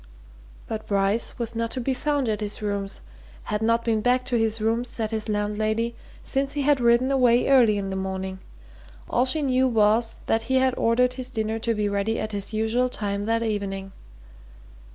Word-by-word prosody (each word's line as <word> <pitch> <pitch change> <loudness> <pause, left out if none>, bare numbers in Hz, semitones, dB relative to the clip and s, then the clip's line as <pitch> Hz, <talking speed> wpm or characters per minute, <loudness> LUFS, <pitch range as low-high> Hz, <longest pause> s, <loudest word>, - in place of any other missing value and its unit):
But 220 -1 -5
Bryce 200 +2 0
was 235 -2 -4
not 230 0 -1
to - - 0
be 260 +2 0
found 285 0 0
at 215 -1 -1
his 210 0 -3
rooms 200 -1 -3 0.4
had 210 0 -2
not 230 +1 +2
been 225 -2 +1
back 250 +2 +2
to 245 - -1
his 225 -1 +1
rooms, 230 +3 0
said 220 -2 -3
his 220 0 -2
landlady, 215 +2 -1 0.3
since 275 +1 -1
he 290 -1 -1
had 285 -1 +3
ridden 240 +2 +3
away 250 -3 +4
early 240 -6 +5
in 195 -1 -3
the - - -3
morning: 190 0 -4 0.7
all 245 +2 +1
she 305 +3 +1
knew 260 -1 +3
was 225 0 +2
that 225 - +1
he 260 - +2
had 260 0 +3
ordered 250 +2 +2
his 255 0 -6
dinner 220 -2 -2
to 230 0 -1
be 210 -1 0
ready 200 +2 -1
at 215 - -3
his 200 0 -3
usual 225 +3 +1
time 205 -3 -3
that 230 0 +1
evening. 195 -3 -3
225 Hz, 195 wpm, -25 LUFS, 210-250 Hz, 0.7 s, early